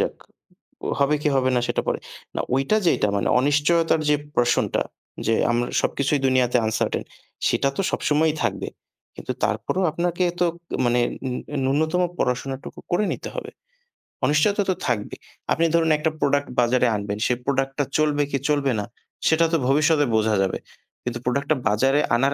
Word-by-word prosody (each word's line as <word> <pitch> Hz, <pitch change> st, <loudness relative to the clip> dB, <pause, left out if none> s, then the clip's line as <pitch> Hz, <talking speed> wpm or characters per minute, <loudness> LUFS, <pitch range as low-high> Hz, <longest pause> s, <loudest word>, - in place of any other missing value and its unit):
যাক। -, -, 0 dB, 0.7 s
ও -, -, 0 dB
হবে 140 Hz, +2 st, +3 dB
কি 150 Hz, -, +3 dB
হবে 130 Hz, -1 st, +2 dB
না -, -, +3 dB
সেটা -, -, 0 dB
পরে। -, -, 0 dB, 0.4 s
না -, -, 0 dB
ঐইটা 135 Hz, +11 st, +2 dB
যেইটা 135 Hz, -, +3 dB
মানে -, -, 0 dB
অনিশ্চয়তার 150 Hz, +4 st, +2 dB
যেই 150 Hz, -1 st, +3 dB, 0.2 s
portion 120 Hz, 0 st, +3 dB, 0.6 s
যে 115 Hz, -, +3 dB, 0.2 s
আমরা 120 Hz, +1 st, 0 dB
সবকিছুই 140 Hz, +1 st, 0 dB
দুনিয়াতে 125 Hz, -1 st, +3 dB
uncertain 110 Hz, +1 st, -1 dB, 0.4 s
সেটা 140 Hz, -, +2 dB
তো -, -, +2 dB
সবসময়ই 155 Hz, +1 st, +1 dB
থাকবে। 110 Hz, -5 st, -1 dB, 0.5 s
কিন্তু -, -, -5 dB
তারপরও 190 Hz, -, 0 dB
আপনাকে 175 Hz, +2 st, -1 dB, 0.2 s
তো 175 Hz, -, +4 dB, 0.4 s
মানে 120 Hz, 0 st, +3 dB, 0.7 s
নূ 135 Hz, -, +2 dB
ন্যূনতম 160 Hz, +3 st, +1 dB, 0.2 s
পড়াশোনাটুকু 130 Hz, +2 st, -3 dB
করে 175 Hz, +4 st, +2 dB
নিতে -, -, -7 dB
হবে। -, -, -5 dB, 0.7 s
অনিশ্চয়তা 200 Hz, +8 st, +3 dB
তো 185 Hz, -, +2 dB
থাকবেই। 110 Hz, -4 st, -2 dB, 0.3 s
আপনি 165 Hz, -, +2 dB
ধরুন 165 Hz, -1 st, +3 dB
একটা 155 Hz, +1 st, 0 dB
প্রোডাক্ট 145 Hz, 0 st, +1 dB
বাজারে 125 Hz, +1 st, +3 dB
আনবেন। 100 Hz, 0 st, -3 dB
সে -, -, +2 dB
প্রোডাক্টটা 135 Hz, +1 st, 0 dB
চলবে 150 Hz, -1 st, +2 dB
কি 140 Hz, -, +1 dB
চলবে 145 Hz, -2 st, +2 dB
না 105 Hz, -, -3 dB, 0.4 s
সেটা 165 Hz, +1 st, +4 dB
তো -, -, +5 dB
ভবিষ্যতে 145 Hz, +2 st, +3 dB
বোঝা 110 Hz, 0 st, +2 dB
যাবে। 95 Hz, -, -1 dB, 0.5 s
কিন্তু 120 Hz, -1 st, -3 dB
প্রোডাক্টটা 140 Hz, +5 st, +1 dB
বাজারে 135 Hz, +7 st, +3 dB, 0.2 s
আনার 135 Hz, +4 st, +2 dB
140 Hz, 160 wpm, -23 LUFS, 125-155 Hz, 0.7 s, তো